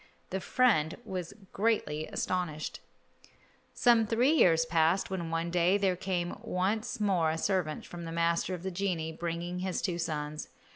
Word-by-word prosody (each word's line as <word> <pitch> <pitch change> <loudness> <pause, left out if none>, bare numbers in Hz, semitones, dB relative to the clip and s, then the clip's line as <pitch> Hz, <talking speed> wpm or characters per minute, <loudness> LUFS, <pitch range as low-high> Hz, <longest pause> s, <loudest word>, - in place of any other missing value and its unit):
The 190 - -1
friend 195 -9 +2
was 180 -3 -5 0.2
greatly 190 -8 0
astonished. 165 -4 -2 1.0
Some 235 -3 +4
three 240 +6 +3
years 165 - +5
passed 165 +4 +2
when 175 -3 -3
one 165 +1 -1
day 180 +3 +3
there 195 -2 +1
came 175 -1 -2
once 215 +6 -1
more 185 -6 +2
a 160 - -1
servant 170 -3 -1
from 170 -1 -8
the 165 - -5
master 170 +2 +1
of 175 - -10
the 190 - -3
genii, 175 -4 -2
bringing 170 +2 -4
his 185 0 -2
two 175 -3 -2
sons. 150 -2 -3
175 Hz, 155 wpm, -30 LUFS, 165-195 Hz, 1.0 s, years